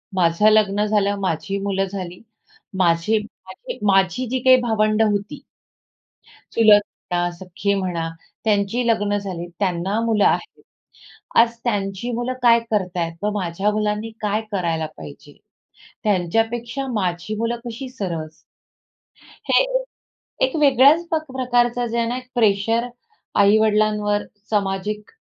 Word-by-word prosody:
माझं 175 Hz, +4 st, +4 dB
लग्न 210 Hz, -1 st, +3 dB
झालं, 205 Hz, -1 st, +1 dB
माझी 195 Hz, +2 st, -2 dB
मुलं 195 Hz, -1 st, 0 dB
झाली, 185 Hz, -2 st, -7 dB, 0.6 s
माझे 175 Hz, +4 st, +2 dB
माझी 210 Hz, -, -10 dB
माझी 195 Hz, +6 st, +2 dB
जी 260 Hz, 0 st, -1 dB
काही 255 Hz, +1 st, +6 dB
भावंडं 220 Hz, -1 st, +2 dB
होती 205 Hz, +8 st, -3 dB, 1.1 s
चुलत 215 Hz, -2 st, +6 dB, 0.3 s
म्हणा, 175 Hz, 0 st, +1 dB
सख्खी 190 Hz, +3 st, -2 dB
म्हणा, 175 Hz, -4 st, -2 dB, 0.4 s
त्यांची 210 Hz, +3 st, +1 dB
लग्न 205 Hz, -2 st, +1 dB
झाली, 180 Hz, -4 st, -5 dB
त्यांना 190 Hz, +2 st, 0 dB
मुलं 220 Hz, -3 st, +2 dB
आहेत. -, -, 0 dB, 0.8 s
आज 235 Hz, 0 st, +1 dB
त्यांची 205 Hz, 0 st, -2 dB
मुलं 240 Hz, +2 st, -2 dB
काय 235 Hz, -1 st, +6 dB
करत 185 Hz, -3 st, -1 dB
आहेत 165 Hz, +2 st, -3 dB
व 210 Hz, -, +2 dB
माझ्या 190 Hz, +3 st, -1 dB
मुलांनी 210 Hz, +1 st, -1 dB
काय 210 Hz, +1 st, 0 dB
करायला 165 Hz, -5 st, -1 dB
पाहिजे, 75 Hz, -2 st, -12 dB, 0.7 s
त्यांच्यापेक्षा 225 Hz, +7 st, 0 dB
माझी 180 Hz, 0 st, -2 dB
मुलं 230 Hz, +1 st, -1 dB
कशी 240 Hz, +3 st, -6 dB
सरस 165 Hz, -9 st, -5 dB, 1.2 s
हे -, -, +5 dB
एक, -, -, -1 dB, 0.6 s
एक 260 Hz, +4 st, +2 dB
वेगळ्याच 285 Hz, +4 st, +5 dB
पक 315 Hz, -1 st, 0 dB
प्रकारचं 245 Hz, -1 st, +1 dB
जे 235 Hz, +1 st, -3 dB
आहे 230 Hz, 0 st, +1 dB
ना, 245 Hz, +2 st, -2 dB
एक 255 Hz, 0 st, -9 dB
प्रेशर 225 Hz, +2 st, +2 dB, 0.5 s
आई-वडिलांवर 210 Hz, 0 st, +3 dB, 0.3 s
सामाजिक 205 Hz, 0 st, -2 dB
210 Hz, 125 wpm, -21 LUFS, 190-235 Hz, 1.2 s, काही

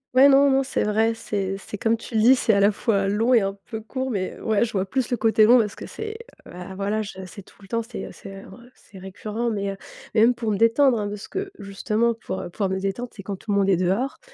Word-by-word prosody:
Ouais, 270 Hz, +2 st, +8 dB
non, 280 Hz, +1 st, +6 dB
non, 270 Hz, 0 st, +3 dB
c'est 270 Hz, -, -1 dB
vrai, 220 Hz, +2 st, +1 dB
c'est 200 Hz, -4 st, -3 dB
c'est 200 Hz, +1 st, -8 dB
comme 225 Hz, +2 st, +1 dB
tu 230 Hz, -, -11 dB
le 220 Hz, -, +2 dB
dis, 250 Hz, +4 st, +7 dB
c'est 230 Hz, -3 st, +2 dB
à 200 Hz, -, +3 dB
la 200 Hz, +1 st, +5 dB
fois 200 Hz, -1 st, 0 dB
long 220 Hz, +5 st, +2 dB
et 235 Hz, -, +6 dB
un 195 Hz, 0 st, -3 dB
peu 220 Hz, -2 st, -6 dB
court. 260 Hz, +3 st, -4 dB
Mais 185 Hz, -3 st, -3 dB
ouais, 220 Hz, -1 st, +1 dB
je 235 Hz, -, -2 dB
vois 190 Hz, -2 st, 0 dB
plus 255 Hz, +4 st, -2 dB
le 245 Hz, -, 0 dB
côté 220 Hz, -1 st, +4 dB
long 240 Hz, +3 st, +7 dB
parce 215 Hz, -4 st, +1 dB
que -, -, -9 dB
c'est, 435 Hz, 0 st, -6 dB, 0.4 s
heu, -, -, -12 dB
bah, 180 Hz, +2 st, -9 dB
voilà, 200 Hz, +3 st, -1 dB
je 190 Hz, -2 st, -7 dB
c'est 200 Hz, +3 st, -10 dB
tout -, -, -21 dB
le -, -, -13 dB
temps, 230 Hz, +3 st, -1 dB
c'est, 230 Hz, +1 st, -7 dB
heu, -, -, -8 dB
c'est, 195 Hz, 0 st, -11 dB
heu, -, -, -13 dB
re 190 Hz, -, -13 dB, 0.2 s
c'est 195 Hz, -3 st, -15 dB
récurrent. 215 Hz, +5 st, -4 dB
Mais, 200 Hz, -2 st, -2 dB
heu, -, -, -6 dB, 0.4 s
mais 215 Hz, -, +3 dB
même 240 Hz, +2 st, +5 dB
pour 225 Hz, -2 st, -2 dB
me 205 Hz, -, 0 dB
détendre 230 Hz, +2 st, +4 dB
hein, 205 Hz, -, -2 dB
de 205 Hz, -, -4 dB
ce 210 Hz, -, -10 dB
que 390 Hz, 0 st, -4 dB
justement 215 Hz, +4 st, -1 dB
pour, 225 Hz, -4 st, -6 dB
heu, -, -, -7 dB
pour 195 Hz, +1 st, -1 dB
me 190 Hz, -, -1 dB
détendre, 195 Hz, +6 st, -3 dB
c'est 200 Hz, -, -11 dB
quand 195 Hz, 0 st, -5 dB
tout 215 Hz, -, -16 dB
le 200 Hz, -, +2 dB
monde 195 Hz, -1 st, +2 dB
est 190 Hz, -, +4 dB
dehors 195 Hz, +10 st, -1 dB
215 Hz, 295 wpm, -23 LUFS, 195-235 Hz, 0.4 s, Ouais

